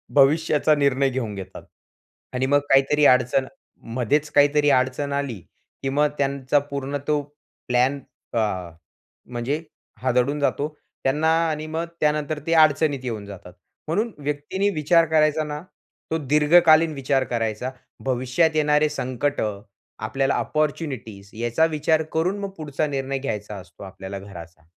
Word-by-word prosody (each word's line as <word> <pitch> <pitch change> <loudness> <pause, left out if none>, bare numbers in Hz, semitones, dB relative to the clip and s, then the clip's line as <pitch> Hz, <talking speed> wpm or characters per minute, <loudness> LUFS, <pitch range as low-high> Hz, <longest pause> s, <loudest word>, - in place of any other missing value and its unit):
भविष्याचा 150 +2 +4
निर्णय 140 -2 +2
घेऊन 120 -5 -3
घेतात 95 -2 -9 0.7
आणि 130 +1 0
मग 145 +1 +4
काहीतरी 140 +2 +4
अडचण 130 +1 +4 0.5
मध्येच 145 +5 +1
काहीतरी 145 0 +4
अडचण 130 +2 +1
आली, 140 -7 -2 0.4
की 135 - 0
मग 145 +2 +3
त्यांचा 140 0 +1
पूर्ण 140 0 -4
तो 150 -1 +2 0.5
प्लॅन 125 +3 +2 0.3
अ, 115 - +1 0.9
म्हणजे 125 +6 -3 0.4
हादडून 130 +3 +1
जातो, 145 +1 0 0.4
त्यांना 150 +4 +1 0.2
आणि 155 0 -3
मग 160 +2 -2 0.2
त्यानंतर 150 0 0
ते 165 - +2
अडचणीत 155 -3 +4
येऊन 110 -5 -4
जातात. 95 -3 -11 0.3
म्हणून 215 +8 0
व्यक्तींनी 150 +7 -1
विचार 165 +2 +4
करायचा 155 0 +2
ना, 150 0 -5 0.5
तो 160 - +1
दीर्घकालीन 155 +2 +5
विचार 135 -1 0
करायचा, 115 +1 -2 0.3
भविष्यात 130 +6 +1
येणारे 150 0 +3
संकटं, 125 -6 -2 0.4
आपल्याला 135 +6 0
अपॉर्च्युनिटीज 135 -10 -3
याचा 120 +7 +1
विचार 160 0 +1
करून 180 +5 0
मग 200 -1 -4
पुढचा 150 -1 -2
निर्णय 135 -1 -2
घ्यायचा 105 -6 -4
असतो 90 0 -12
आपल्याला 95 0 -7
घराचा. 85 -4 -11
140 Hz, 130 wpm, -23 LUFS, 125-150 Hz, 0.9 s, दीर्घकालीन